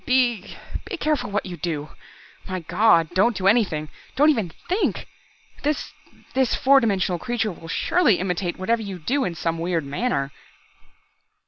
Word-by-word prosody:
"Be 245 Hz, -6 st, +1 dB, 0.3 s
be 380 Hz, -, -5 dB
careful 305 Hz, -7 st, 0 dB
what 205 Hz, +1 st, -1 dB
you 180 Hz, -2 st, -6 dB
do! 155 Hz, -2 st, -3 dB, 0.6 s
My 185 Hz, -1 st, -3 dB
God, 170 Hz, -2 st, +3 dB
don't 205 Hz, +4 st, +3 dB
do 190 Hz, -, -3 dB
anything. 195 Hz, -8 st, +3 dB, 0.3 s
Don't 295 Hz, +3 st, +6 dB
even 220 Hz, -, -1 dB, 0.2 s
think. 375 Hz, +5 st, 0 dB, 0.6 s
This 300 Hz, +1 st, -1 dB, 0.4 s
this 260 Hz, -2 st, +2 dB
four 275 Hz, +1 st, +5 dB
dimensional 190 Hz, -6 st, 0 dB
creature 230 Hz, -1 st, -1 dB
will 165 Hz, -1 st, -11 dB
surely 240 Hz, -, +3 dB
imitate 180 Hz, -1 st, -2 dB
whatever 225 Hz, +5 st, 0 dB
you 200 Hz, -3 st, -5 dB
do 260 Hz, -, 0 dB
in 175 Hz, -3 st, -3 dB
some 165 Hz, 0 st, -2 dB
weird 165 Hz, -2 st, -1 dB
manner." 140 Hz, -, -1 dB
200 Hz, 150 wpm, -23 LUFS, 170-250 Hz, 0.6 s, Don't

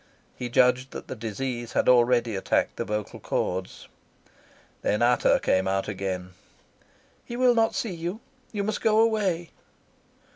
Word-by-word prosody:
He 125 Hz, -, -5 dB
judged 125 Hz, +1 st, +3 dB
that -, -, -7 dB
the -, -, -4 dB
disease 120 Hz, +2 st, -4 dB
had -, -, +1 dB
already 120 Hz, -2 st, +4 dB
attacked 95 Hz, -, 0 dB
the -, -, -2 dB
vocal 105 Hz, -1 st, -4 dB
chords. 95 Hz, +1 st, -3 dB, 0.9 s
Then 105 Hz, +3 st, +1 dB
Ata 120 Hz, 0 st, +4 dB
came 95 Hz, 0 st, +2 dB
out 95 Hz, 0 st, 0 dB
again. 95 Hz, -2 st, -4 dB, 0.9 s
"He 240 Hz, -, -7 dB
will 250 Hz, -1 st, +5 dB
not 225 Hz, -1 st, +2 dB
see 220 Hz, -5 st, -2 dB
you. 175 Hz, +5 st, -4 dB, 0.3 s
You 205 Hz, -2 st, -2 dB
must 215 Hz, +1 st, -2 dB
go 220 Hz, 0 st, +3 dB
away." 200 Hz, -7 st, +1 dB
125 Hz, 145 wpm, -26 LUFS, -, 0.9 s, will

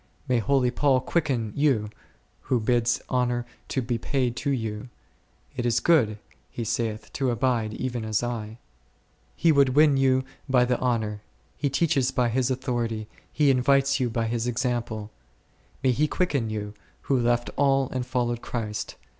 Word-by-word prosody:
May 125 Hz, -2 st, +2 dB
holy 125 Hz, +2 st, +2 dB
Paul 135 Hz, -1 st, +3 dB
quicken 130 Hz, -7 st, -1 dB
you, 130 Hz, -8 st, +1 dB, 0.6 s
who 125 Hz, -, +3 dB
bids 120 Hz, +1 st, +1 dB
honour 125 Hz, -1 st, 0 dB, 0.2 s
to 130 Hz, -, -1 dB
be 120 Hz, -1 st, -2 dB
paid 125 Hz, -1 st, -1 dB
to -, -, -2 dB
you; 110 Hz, -3 st, -3 dB, 0.7 s
it 125 Hz, -, -2 dB
is 120 Hz, -1 st, +2 dB
good, 125 Hz, -11 st, +3 dB, 0.3 s
he 120 Hz, -, -5 dB
saith, 110 Hz, -1 st, -3 dB
to 135 Hz, -2 st, 0 dB
abide 120 Hz, -3 st, 0 dB
even 125 Hz, -2 st, -3 dB
as 110 Hz, +1 st, 0 dB
I. 115 Hz, -2 st, -4 dB, 0.8 s
He 165 Hz, -, +3 dB
would 140 Hz, -3 st, +3 dB
win 150 Hz, -1 st, +6 dB
vou 130 Hz, -1 st, +3 dB, 0.3 s
bv 125 Hz, -2 st, +4 dB
the 125 Hz, -, +1 dB
honour, 110 Hz, -4 st, -1 dB, 0.3 s
he 145 Hz, -, -1 dB
teaches 140 Hz, -2 st, +2 dB
by 125 Hz, -1 st, +1 dB
his 125 Hz, +2 st, +1 dB
authority, 120 Hz, -4 st, -2 dB, 0.2 s
he 145 Hz, -2 st, +3 dB
invites 135 Hz, +2 st, +3 dB
you 125 Hz, -2 st, +1 dB
by 115 Hz, 0 st, -1 dB
his 115 Hz, +1 st, -1 dB
example. 120 Hz, -3 st, -2 dB, 0.7 s
May 130 Hz, -, +4 dB
he 150 Hz, +5 st, +2 dB
quicken 145 Hz, -10 st, 0 dB
you, 105 Hz, -1 st, -4 dB, 0.3 s
who 135 Hz, -2 st, +1 dB
left 120 Hz, 0 st, +1 dB
all 135 Hz, -1 st, +3 dB
and 130 Hz, -1 st, -2 dB
followed 120 Hz, -2 st, -1 dB
Christ! 105 Hz, -3 st, -4 dB
125 Hz, 160 wpm, -26 LUFS, 115-135 Hz, 0.8 s, win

